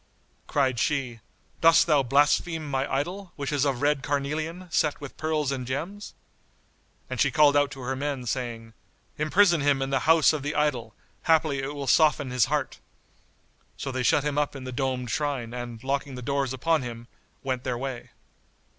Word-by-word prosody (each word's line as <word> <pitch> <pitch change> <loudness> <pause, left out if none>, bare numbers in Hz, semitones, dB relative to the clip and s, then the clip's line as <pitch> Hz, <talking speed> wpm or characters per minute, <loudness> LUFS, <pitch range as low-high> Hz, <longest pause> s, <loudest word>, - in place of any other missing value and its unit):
Cried 130 -4 +1
she, 130 -5 -1 0.4
"Dost 165 0 +6
thou 150 -4 +4
blaspheme 145 +4 +2
my 135 0 -2
idol, 180 +7 -3
which 140 0 -4
is 145 -1 +1
of 135 -2 -1
red 145 -1 +2
carnelian, 155 +6 -3
set 150 -2 +1
with 145 -3 -9
pearls 155 -3 -1
and 130 -3 -4
gems?" 170 +11 -5 0.9
And 130 -1 -3
she 140 - +4
called 145 +2 +4
out 145 0 +3
to 135 -2 -9
her 130 +1 -2
men, 140 -2 -3
saying, 115 -2 -4 0.5
"Imprison 170 +2 +4
him 140 -1 +2
in 135 0 -2
the 135 - +2
house 160 -1 +6
of 155 - -2
the 145 +2 -3
idol; 125 -7 -1 0.3
haply 155 -4 +3
it 140 +2 -5
will 140 -1 -4
soften 145 -2 +3
his 125 -3 +3
heart." 145 -1 -2 1.0
So 135 - -4
they 130 0 -2
shut 135 +3 +3
him 145 0 0
up 145 -1 -1
in 135 - -7
the 130 - -6
domed 130 -2 -2
shrine 140 -6 -2
and 120 -1 -7
locking 140 0 -2
the 125 - -7
doors 140 0 -1
upon 155 +4 +1
him, 120 -1 -7 0.4
went 130 -2 -2
their 125 - -2
way. 130 -1 -5
140 Hz, 180 wpm, -26 LUFS, 130-150 Hz, 1.0 s, Dost